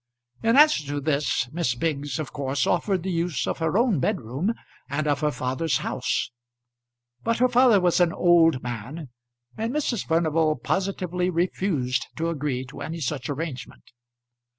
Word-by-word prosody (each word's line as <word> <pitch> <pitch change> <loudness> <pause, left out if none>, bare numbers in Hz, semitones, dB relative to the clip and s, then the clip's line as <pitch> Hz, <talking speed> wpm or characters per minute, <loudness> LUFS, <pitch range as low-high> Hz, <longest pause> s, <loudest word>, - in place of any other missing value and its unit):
In 230 +3 +3
answer 300 - +6
to 145 0 -2
this 140 -3 0
Miss 155 -7 -1
Biggs 145 -1 -2
of 155 -3 -5
course 140 -2 -1
offered 190 -4 0
the 190 - -2
use 170 -4 -1
of - - -3
her 160 +3 +1
own 230 - +3
bedroom 130 - -1 0.4
and 145 +3 -1
of 145 -2 +1
her 150 0 +1
father's 130 +3 -1
house; - - -2 0.9
but 230 0 +1
her 255 - +4
father 245 -4 +5
was 180 -1 +2
an 175 -2 +4
old 165 -7 +4
man, 125 +6 -6 0.5
and 225 +2 -2
Mrs. 260 -7 -1
Furnival 160 -1 +2
positively 180 +2 -1
refused 170 -7 0
to 165 +1 -1
agree 140 -5 -2
to 130 - -11
any 165 +1 -5
such 135 -2 -3
arrangement. 135 - -5
160 Hz, 155 wpm, -25 LUFS, 140-180 Hz, 0.9 s, answer